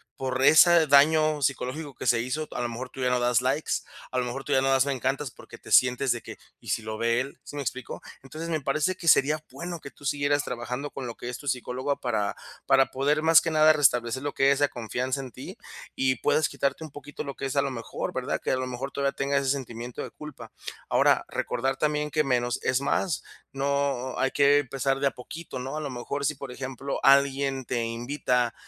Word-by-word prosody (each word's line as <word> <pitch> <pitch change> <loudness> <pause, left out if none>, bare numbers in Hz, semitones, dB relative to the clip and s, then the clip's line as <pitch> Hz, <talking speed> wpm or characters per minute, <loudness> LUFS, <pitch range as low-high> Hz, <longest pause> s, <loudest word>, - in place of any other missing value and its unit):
por 130 0 -2
ese 160 +2 +7
daño 155 +1 +4
psicológico 140 +3 -2
que - - -6
se 120 - +4
hizo. 150 +6 -3
A - - -3
lo 120 - -1
mejor 125 +2 -6
tú 130 - -9
ya 125 - +2
no 125 - +2
das 120 0 +2
likes, 135 +4 -1 0.4
a 130 - -2
lo 125 - +1
mejor 125 +3 -5
tú 145 - -6
ya 130 - +4
no 135 - +1
das 135 +1 +3
me 140 - +1
encantas 135 +2 -2
porque - - -14
te - - -13
sientes 125 +1 +4
de 120 - -1
que: - - -9 0.2
"¿Y - - -11
si - - 0
lo 110 0 -5
ve 115 +1 +1
él?", 135 0 -8
¿sí 145 - -10
me 145 - -3
explico? 130 -1 -5 0.2
Entonces 155 +5 -7
me 155 -2 -1
parece 155 +7 0
que 175 - -8
sería 155 +1 +4
bueno 175 0 -6
que 140 - -10
tú 145 - -15
siguieras 145 +1 +1
trabajando 125 +3 -4
con 135 - -7
lo 120 - -5
que 120 - -7
es 125 - -5
tu 145 - -11
psicóloga 130 +2 -2
para 110 -5 -1 0.3
para 135 0 +5
poder 145 +3 +1
más 160 0 +6
que 165 - -2
nada 155 0 +6
restablecer 130 -3 +2
lo 145 - -3
que 135 +1 +4
es 140 - +2
la 145 -1 +3
confianza 125 +3 -3
en 130 -2 -8
ti - - -9 0.4
y 130 -1 +2
puedas 155 - +1
quitarte 140 +3 -2
un 155 - -7
poquito 145 +1 -8
lo 140 - -5
que - - -5
es, 135 - -3
a 140 - +5
lo 140 - -2
mejor, 115 -2 -5
¿verdad?, - - -2
que - - -1
a - - +3
lo 130 0 -2
mejor 130 +2 -5
todavía 140 0 0
tengas 140 0 0
ese 135 - +1
sentimiento 120 -3 -5
de - - -6
culpa. 135 -7 -10 0.4
Ahora - - +3
recordar 135 +2 -2
también 150 0 0
que 155 +1 +1
menos 120 -3 0
es 130 0 +2
más, 150 +2 0 0.3
no 140 -2 -1
hay 135 - +1
que 145 0 +5
empezar 135 0 -1
de 140 - +3
a - - +1
poquito. 155 +3 -8
¿No?, 135 +3 -5
a - - -3
lo 145 - -4
mejor 140 +3 -4
si, 150 +2 0
por 135 -1 -8
ejemplo, 135 +1 -4
alguien 135 -1 +3
te 120 0 -1
invita 120 +1 -1
135 Hz, 235 wpm, -26 LUFS, 125-145 Hz, 0.4 s, ese